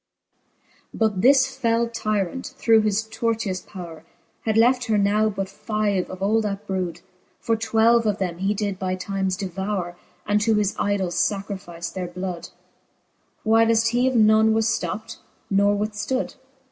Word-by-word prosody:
VIII. -, -, -39 dB
But 215 Hz, -4 st, +1 dB
this 260 Hz, +2 st, +6 dB
fell 235 Hz, -2 st, +1 dB
tyrant, 220 Hz, +2 st, -3 dB
through 225 Hz, -3 st, +4 dB
his 215 Hz, 0 st, +1 dB
tortious 220 Hz, -4 st, -2 dB
powre, 170 Hz, -5 st, -9 dB, 0.4 s
Had 220 Hz, -1 st, +1 dB
left 245 Hz, +2 st, +4 dB
her 220 Hz, -1 st, +1 dB
now 210 Hz, +2 st, +2 dB
but 195 Hz, -2 st, -3 dB
five 205 Hz, -1 st, -2 dB
of 185 Hz, +1 st, -6 dB
all 220 Hz, +3 st, +3 dB
that 205 Hz, -1 st, -4 dB
brood: 185 Hz, -4 st, -3 dB, 0.4 s
For 225 Hz, -, 0 dB
twelve 225 Hz, +1 st, +3 dB
of 205 Hz, -1 st, +1 dB
them 180 Hz, -4 st, -3 dB
he 195 Hz, +2 st, 0 dB
did 200 Hz, -2 st, -3 dB
by 185 Hz, -1 st, -1 dB
times 190 Hz, 0 st, -2 dB
devoure, 190 Hz, -2 st, -3 dB, 0.3 s
And 210 Hz, 0 st, +1 dB
to 220 Hz, +1 st, +2 dB
his 210 Hz, -1 st, 0 dB
idols 190 Hz, -3 st, +1 dB
lacrifice 190 Hz, -4 st, -6 dB
their 185 Hz, -1 st, -4 dB
blood, 180 Hz, -1 st, -6 dB, 1.0 s
Whileft 225 Hz, 0 st, +4 dB
he 245 Hz, +2 st, +2 dB
of 260 Hz, -, 0 dB
none 220 Hz, 0 st, +5 dB
was 225 Hz, 0 st, +2 dB
flopped, 220 Hz, +1 st, -5 dB, 0.3 s
nor 200 Hz, +1 st, +3 dB
withftood. 210 Hz, +5 st, -2 dB
210 Hz, 155 wpm, -23 LUFS, 190-225 Hz, 1.0 s, this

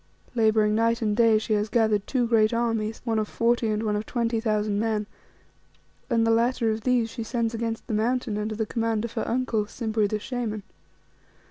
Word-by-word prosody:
Labouring 220 Hz, -2 st, +3 dB
night 230 Hz, +1 st, +1 dB
and 210 Hz, -1 st, +1 dB
day, 225 Hz, -1 st, +5 dB
she 215 Hz, 0 st, -1 dB
has 210 Hz, 0 st, 0 dB
gathered 220 Hz, -3 st, +1 dB
two 255 Hz, -3 st, +1 dB
great 225 Hz, -1 st, +3 dB
armies, 225 Hz, -2 st, -1 dB
one 225 Hz, -2 st, +1 dB
of 215 Hz, -, -1 dB
forty, 235 Hz, +1 st, +1 dB
and 215 Hz, 0 st, -1 dB
one 210 Hz, -1 st, 0 dB
of 210 Hz, +1 st, -3 dB
twenty 230 Hz, -2 st, 0 dB
thousand 210 Hz, -2 st, 0 dB
men, 215 Hz, -1 st, 0 dB, 1.0 s
and 230 Hz, -2 st, +2 dB
the 225 Hz, -, +3 dB
latter 230 Hz, 0 st, +2 dB
of 220 Hz, +1 st, -3 dB
these 245 Hz, -1 st, +2 dB
she 235 Hz, -, -6 dB
sends 230 Hz, 0 st, -1 dB
against 230 Hz, 0 st, -3 dB
the 230 Hz, -, -4 dB
Mountain 225 Hz, 0 st, 0 dB
under 215 Hz, +1 st, -3 dB
the 220 Hz, 0 st, -1 dB
command 225 Hz, 0 st, -1 dB
of 235 Hz, -, -7 dB
her -, -, -2 dB
uncle, 230 Hz, -4 st, 0 dB
Simbri 220 Hz, -2 st, -1 dB
the 215 Hz, -, -1 dB
Shaman. 220 Hz, -2 st, -4 dB
225 Hz, 200 wpm, -26 LUFS, 215-235 Hz, 1.0 s, day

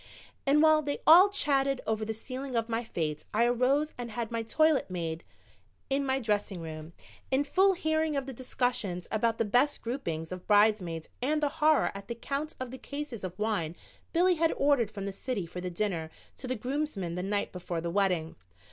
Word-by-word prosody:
And 295 Hz, +3 st, +5 dB
while 310 Hz, -1 st, +6 dB
they 285 Hz, -1 st, -2 dB
all 360 Hz, +5 st, +9 dB
chatted 275 Hz, -8 st, +1 dB
over 220 Hz, 0 st, -1 dB
the 220 Hz, -, -2 dB
sealing 255 Hz, +4 st, -5 dB
of 230 Hz, -1 st, +1 dB
my 230 Hz, 0 st, -1 dB
fate 155 Hz, -8 st, -3 dB
I 230 Hz, +2 st, +4 dB
arose 255 Hz, +5 st, +2 dB
and 240 Hz, -1 st, -4 dB
had 230 Hz, 0 st, -4 dB
my 230 Hz, -1 st, -1 dB
toilet 310 Hz, +5 st, +2 dB
made 165 Hz, -2 st, -4 dB, 0.7 s
in 275 Hz, 0 st, +1 dB
my 265 Hz, 0 st, +1 dB
dressing 205 Hz, -5 st, -1 dB
room, 160 Hz, 0 st, -7 dB, 0.4 s
in 265 Hz, +2 st, +2 dB
full 385 Hz, +6 st, +4 dB
hearing 315 Hz, -3 st, 0 dB
of 275 Hz, -, -1 dB
the 270 Hz, -, -6 dB
discussions 240 Hz, -7 st, -2 dB
about 225 Hz, +1 st, +1 dB
the -, -, +1 dB
best 250 Hz, +7 st, +2 dB
groupings 170 Hz, -, -3 dB
of 185 Hz, -1 st, -7 dB
bridesmaids 205 Hz, -6 st, +3 dB
and 300 Hz, +5 st, +1 dB
the 290 Hz, -, +3 dB
horror 310 Hz, -1 st, +3 dB
at 200 Hz, 0 st, -9 dB
the 235 Hz, -, -4 dB
count 280 Hz, +6 st, -4 dB
of 255 Hz, -2 st, -5 dB
the 260 Hz, -, -8 dB
cases 285 Hz, -6 st, -6 dB
of 185 Hz, -1 st, -5 dB
wine 205 Hz, -7 st, -1 dB, 0.4 s
Billy 360 Hz, +2 st, +4 dB
had 330 Hz, -1 st, +2 dB
ordered 280 Hz, -6 st, +3 dB
from 200 Hz, -2 st, -6 dB
the 200 Hz, -, -3 dB
city 200 Hz, -1 st, -3 dB
for 175 Hz, +2 st, -7 dB
the 180 Hz, -, -3 dB
dinner 175 Hz, -3 st, -2 dB, 0.3 s
to 260 Hz, -, -6 dB
the 255 Hz, -, -1 dB
groomsmen 250 Hz, -, -3 dB
the 180 Hz, -, -3 dB
night 200 Hz, +2 st, -1 dB
before 175 Hz, -2 st, -4 dB
the 170 Hz, +1 st, -3 dB
wedding. 180 Hz, -4 st, +1 dB
235 Hz, 200 wpm, -29 LUFS, 190-280 Hz, 0.7 s, all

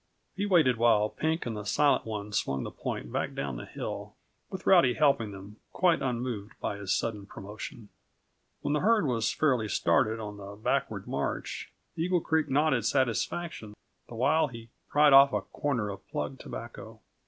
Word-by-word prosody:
He 200 Hz, +1 st, -1 dB
waited 155 Hz, -, +4 dB
while 110 Hz, -2 st, +4 dB
Pink 160 Hz, +6 st, -1 dB
and 115 Hz, -2 st, -3 dB
the 105 Hz, -, -5 dB
Silent 140 Hz, +5 st, +2 dB
One 105 Hz, -1 st, -5 dB
swung 70 Hz, -8 st, 0 dB
the -, -, -5 dB
point -, -, -5 dB
back -, -, -2 dB
down 70 Hz, -3 st, -3 dB
the -, -, -8 dB
hill, -, -, -6 dB, 0.3 s
with 190 Hz, -, -7 dB
Rowdy 135 Hz, -10 st, +5 dB
helping 140 Hz, -8 st, +3 dB
them, 100 Hz, +1 st, -10 dB, 0.2 s
quite 175 Hz, -3 st, +3 dB
unmoved 120 Hz, -5 st, -3 dB
by 100 Hz, -, -3 dB
his 100 Hz, -1 st, -4 dB
sudden 105 Hz, -3 st, -1 dB
promotion. 105 Hz, +2 st, -9 dB, 0.7 s
When 145 Hz, -, -1 dB
the 150 Hz, -, +2 dB
herd 215 Hz, 0 st, +3 dB
was 115 Hz, -4 st, +1 dB
fairly 130 Hz, -8 st, +1 dB
started 110 Hz, +7 st, +2 dB
on 105 Hz, -2 st, -6 dB
the 100 Hz, 0 st, -9 dB
backward 105 Hz, -, -1 dB
march, -, -, -3 dB, 0.2 s
Eagle 175 Hz, +2 st, +1 dB
Creek 160 Hz, -2 st, 0 dB
nodded 135 Hz, -4 st, +2 dB
satisfaction 130 Hz, -1 st, -1 dB, 0.3 s
the 120 Hz, -, -8 dB
while 145 Hz, +7 st, +3 dB
he 115 Hz, -3 st, -10 dB, 0.2 s
pried 150 Hz, -1 st, +5 dB
off 140 Hz, 0 st, +8 dB
a -, -, +1 dB
corner 125 Hz, -8 st, -2 dB
of 100 Hz, -, -8 dB
plug -, -, -4 dB
tobacco. -, -, -9 dB
120 Hz, 170 wpm, -29 LUFS, 105-150 Hz, 0.7 s, off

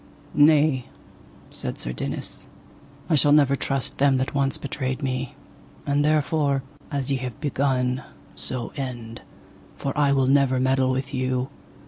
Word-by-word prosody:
Nay, 145 Hz, -3 st, +4 dB, 0.6 s
said -, -, -5 dB
Sir -, -, -4 dB
Dinas, -, -, -4 dB, 0.6 s
I 170 Hz, -, +1 dB
shall 145 Hz, -1 st, +5 dB
never 140 Hz, -2 st, +5 dB
trust 135 Hz, -1 st, -3 dB
them 140 Hz, -1 st, +4 dB
that 130 Hz, 0 st, -1 dB
once 140 Hz, -1 st, +1 dB
betrayed 135 Hz, 0 st, -3 dB
me, 130 Hz, -1 st, -2 dB, 0.5 s
and 145 Hz, +1 st, +2 dB
therefore, 150 Hz, -2 st, +2 dB, 0.3 s
as 140 Hz, -2 st, -2 dB
ye 135 Hz, -, +2 dB
have 130 Hz, +1 st, -6 dB
begun, 130 Hz, -3 st, 0 dB, 0.3 s
so 125 Hz, -2 st, -2 dB
end, 120 Hz, -4 st, -5 dB, 0.6 s
for 135 Hz, -, -3 dB
I 145 Hz, -2 st, +3 dB
will 135 Hz, -1 st, +3 dB
never 135 Hz, -1 st, +3 dB
meddle 130 Hz, 0 st, +2 dB
with 130 Hz, +1 st, -2 dB
you. 130 Hz, 0 st, -1 dB
135 Hz, 140 wpm, -24 LUFS, 130-140 Hz, 0.6 s, shall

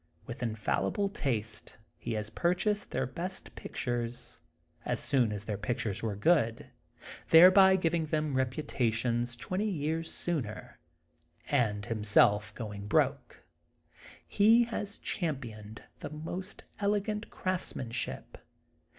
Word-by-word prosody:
With 120 Hz, +2 st, -8 dB
infallible 115 Hz, -, -1 dB
taste 110 Hz, -, -3 dB, 0.2 s
he 115 Hz, -, -4 dB
has 105 Hz, 0 st, -3 dB
purchased 180 Hz, -, 0 dB
their 130 Hz, -, -1 dB
best 175 Hz, +8 st, -6 dB
pictures, 120 Hz, -1 st, -4 dB, 0.4 s
as 125 Hz, -2 st, -1 dB
soon 130 Hz, -6 st, +2 dB
as 105 Hz, -1 st, -4 dB
their 105 Hz, -1 st, -4 dB
pictures 115 Hz, -3 st, -2 dB
were 110 Hz, -3 st, -2 dB
good, 115 Hz, -, +1 dB, 0.6 s
thereby 190 Hz, +3 st, +8 dB
giving 165 Hz, -3 st, 0 dB
them 155 Hz, -1 st, -1 dB
reputations 120 Hz, -3 st, 0 dB
twenty 185 Hz, -, -2 dB
years 160 Hz, -1 st, -2 dB
sooner, 135 Hz, -12 st, -3 dB, 0.7 s
and 105 Hz, -7 st, +1 dB
himself 105 Hz, -1 st, +3 dB
going 105 Hz, -3 st, -6 dB
broke. -, -, 0 dB, 0.8 s
He 225 Hz, +4 st, +5 dB
has 210 Hz, -3 st, -4 dB
championed 115 Hz, -, -4 dB, 0.2 s
the -, -, -6 dB
most 170 Hz, +6 st, -6 dB, 0.2 s
elegant 210 Hz, +1 st, -1 dB
crafts 185 Hz, -1 st, -3 dB
manship. 120 Hz, -1 st, -4 dB
130 Hz, 110 wpm, -31 LUFS, 110-180 Hz, 0.8 s, thereby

